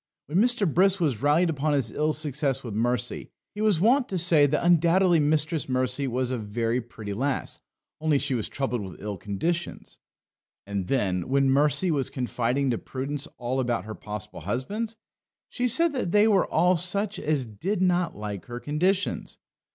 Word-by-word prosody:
When 160 Hz, +7 st, 0 dB
Mr. 240 Hz, -1 st, +3 dB
Brisk 190 Hz, +5 st, +3 dB
was 140 Hz, -10 st, 0 dB
rallied 155 Hz, +4 st, +3 dB
upon 150 Hz, 0 st, -1 dB
his 130 Hz, -6 st, +1 dB
ill 155 Hz, +5 st, 0 dB
success 145 Hz, -3 st, 0 dB
with 115 Hz, -4 st, -6 dB
Mercy, 120 Hz, +3 st, -2 dB, 0.2 s
he 210 Hz, -, -5 dB
was 210 Hz, -6 st, +3 dB
wont 245 Hz, +7 st, +3 dB
to 190 Hz, -, -2 dB
say 160 Hz, -4 st, +5 dB
that 150 Hz, +4 st, 0 dB
undoubtedly 175 Hz, +1 st, +4 dB
Mistress 155 Hz, -1 st, 0 dB
Mercy 130 Hz, +2 st, 0 dB
was 130 Hz, 0 st, -1 dB
a 125 Hz, -, -2 dB
very 115 Hz, +3 st, -1 dB
pretty 110 Hz, -3 st, -8 dB
lass, 135 Hz, +6 st, -2 dB, 0.4 s
only 155 Hz, -2 st, +2 dB
she 135 Hz, -, 0 dB
was 115 Hz, -4 st, -1 dB
troubled 130 Hz, -4 st, -2 dB
with 95 Hz, -5 st, -8 dB
ill 105 Hz, 0 st, -4 dB
conditions. 160 Hz, -, -4 dB, 0.7 s
And 100 Hz, -2 st, -3 dB
then, 95 Hz, -7 st, 0 dB
when 135 Hz, 0 st, +3 dB
Mercy 150 Hz, +6 st, +2 dB
was 140 Hz, -4 st, 0 dB
confiding 125 Hz, +1 st, -1 dB
to 115 Hz, -, -1 dB
Prudence 140 Hz, +3 st, -4 dB
all 125 Hz, +2 st, -2 dB
about 120 Hz, -6 st, -1 dB
her 110 Hz, -, -6 dB
possible 105 Hz, 0 st, -7 dB
husbands, 210 Hz, -, -3 dB, 0.5 s
she 250 Hz, -, -1 dB
said 320 Hz, +7 st, +2 dB
that 245 Hz, -10 st, -2 dB
they 210 Hz, +2 st, +5 dB
were 200 Hz, -4 st, +3 dB
all 180 Hz, +3 st, +3 dB
such 200 Hz, +4 st, +1 dB
as 150 Hz, -4 st, 0 dB
did 170 Hz, -, -3 dB
not 180 Hz, -1 st, +1 dB
like 105 Hz, -2 st, -6 dB
her 120 Hz, 0 st, -6 dB
conditions. 180 Hz, +9 st, -1 dB
145 Hz, 175 wpm, -26 LUFS, 120-175 Hz, 0.7 s, say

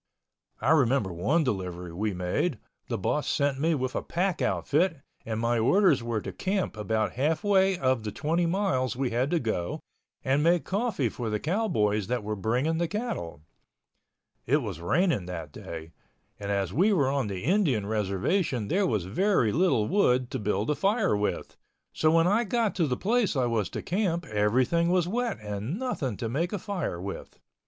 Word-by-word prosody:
I 145 Hz, -, +2 dB
remember 130 Hz, -, +3 dB
one 135 Hz, -, +1 dB
delivery 90 Hz, -, -3 dB
we 105 Hz, +5 st, -1 dB
made, 90 Hz, -, -1 dB, 0.3 s
the 115 Hz, -, -2 dB
boss 140 Hz, +8 st, -1 dB
sent 140 Hz, -2 st, +1 dB
me 160 Hz, +2 st, +2 dB
with 130 Hz, -2 st, -2 dB
a -, -, -1 dB
pack 180 Hz, +1 st, -1 dB
outfit 165 Hz, +3 st, +1 dB, 0.3 s
and 110 Hz, -1 st, -2 dB
my 115 Hz, 0 st, +1 dB
orders 155 Hz, -, +4 dB
were 115 Hz, -2 st, -2 dB
to -, -, -5 dB
camp 190 Hz, -, -1 dB
about 110 Hz, +1 st, -1 dB
halfway 190 Hz, -, +2 dB
of 130 Hz, -5 st, +1 dB
the 105 Hz, -1 st, -4 dB
twenty 165 Hz, +6 st, 0 dB
miles 165 Hz, -10 st, 0 dB
we 130 Hz, -1 st, -1 dB
had 125 Hz, +4 st, 0 dB
to 170 Hz, -, +1 dB
go 110 Hz, -, -2 dB, 0.5 s
and 135 Hz, +2 st, +2 dB
make 170 Hz, +2 st, +3 dB
coffee 200 Hz, -, 0 dB
for 115 Hz, +1 st, -4 dB
the 105 Hz, 0 st, -1 dB
cowboys 110 Hz, -, 0 dB
that 125 Hz, -2 st, -1 dB
were 105 Hz, +1 st, -3 dB
bringing 125 Hz, -, 0 dB
the 170 Hz, -, +1 dB
cattle. 160 Hz, -, -4 dB, 1.0 s
It 145 Hz, +3 st, +2 dB
was 95 Hz, -7 st, -5 dB
raining 105 Hz, -, +1 dB
that 85 Hz, -5 st, -6 dB
day, 80 Hz, +1 st, -8 dB, 0.5 s
and 100 Hz, -1 st, -5 dB
as 100 Hz, -3 st, -1 dB
we 190 Hz, -, +3 dB
were 150 Hz, -10 st, +3 dB
on 135 Hz, -5 st, 0 dB
the 95 Hz, -3 st, -5 dB
Indian 160 Hz, -, +2 dB
reservation 105 Hz, -, 0 dB
there 195 Hz, +1 st, +2 dB
was 105 Hz, -, 0 dB
very 125 Hz, -, +2 dB
little 145 Hz, -, +2 dB
wood 125 Hz, -10 st, +2 dB
to -, -, -2 dB
build 105 Hz, +4 st, 0 dB
a -, -, +1 dB
fire 200 Hz, -, +2 dB
with, 105 Hz, 0 st, -2 dB, 0.4 s
so 155 Hz, -, +2 dB
when 165 Hz, +1 st, +4 dB
I 205 Hz, +6 st, +3 dB
got 230 Hz, 0 st, 0 dB
to 165 Hz, -4 st, +2 dB
the 125 Hz, -2 st, -1 dB
place 220 Hz, -3 st, +1 dB
I 130 Hz, -2 st, +2 dB
was 115 Hz, -6 st, 0 dB
to -, -, -5 dB
camp 175 Hz, -3 st, -1 dB
everything 125 Hz, +9 st, +2 dB
was 180 Hz, -1 st, +2 dB
wet 235 Hz, +3 st, -1 dB
and 105 Hz, -, -4 dB
nothing 155 Hz, -, -2 dB
to 115 Hz, -, -3 dB
make 155 Hz, +10 st, -1 dB
a -, -, 0 dB
fire 180 Hz, -, -3 dB
with. 95 Hz, +2 st, -7 dB
130 Hz, 185 wpm, -27 LUFS, 105-180 Hz, 1.0 s, orders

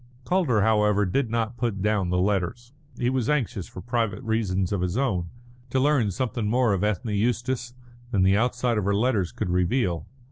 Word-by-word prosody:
Calder, 155 Hz, -, +2 dB
however, 105 Hz, -1 st, +3 dB
did 115 Hz, +7 st, 0 dB
not 115 Hz, +1 st, -1 dB
put 115 Hz, -5 st, -2 dB
down 105 Hz, -4 st, +1 dB
the 90 Hz, -, +1 dB
letters. 105 Hz, +6 st, -1 dB, 0.2 s
He 125 Hz, 0 st, 0 dB
was 130 Hz, -2 st, 0 dB
anxious, 125 Hz, -11 st, -1 dB
for 90 Hz, -, -9 dB
private 120 Hz, -1 st, -1 dB
reasons 100 Hz, -5 st, 0 dB
of 100 Hz, -3 st, 0 dB
his 90 Hz, +3 st, -1 dB
own, 95 Hz, -11 st, 0 dB, 0.4 s
to 130 Hz, -, +1 dB
learn 135 Hz, -6 st, +3 dB
something 115 Hz, +1 st, -2 dB
more 120 Hz, -1 st, +2 dB
of 95 Hz, -, -1 dB
Ethne 105 Hz, +1 st, -1 dB
Eustace 120 Hz, +3 st, -1 dB, 0.3 s
than 100 Hz, -6 st, +2 dB
the 95 Hz, +1 st, +4 dB
outside 120 Hz, 0 st, +1 dB
of 100 Hz, -, -2 dB
her 100 Hz, 0 st, +2 dB
letters 105 Hz, -5 st, +1 dB
could 100 Hz, -5 st, -3 dB
reveal. 90 Hz, 0 st, 0 dB
110 Hz, 185 wpm, -25 LUFS, 95-125 Hz, 0.4 s, the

